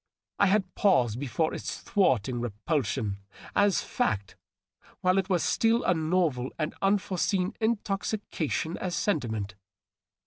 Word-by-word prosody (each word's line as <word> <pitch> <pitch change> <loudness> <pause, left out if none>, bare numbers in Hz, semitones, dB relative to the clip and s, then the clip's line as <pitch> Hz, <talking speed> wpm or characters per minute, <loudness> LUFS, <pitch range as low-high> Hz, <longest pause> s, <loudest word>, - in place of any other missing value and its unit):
I 200 - +5
had 190 -1 +1
paused 125 - +3
before 145 +4 -1
its - - -5
thwarting 130 - +1
repulsion 115 -2 -2 0.4
as 205 -2 +3
fact 100 -3 -1 0.7
while 185 +1 +3
it 190 0 -2
was 180 -3 +2
still 230 +2 +2
a 180 - +3
novel 160 -6 0
and 155 -1 -2
unforeseen 195 -1 +1
intoxication 200 -7 -1
as 180 -2 -2
sentiment. 110 - -1
170 Hz, 115 wpm, -28 LUFS, 125-195 Hz, 0.7 s, I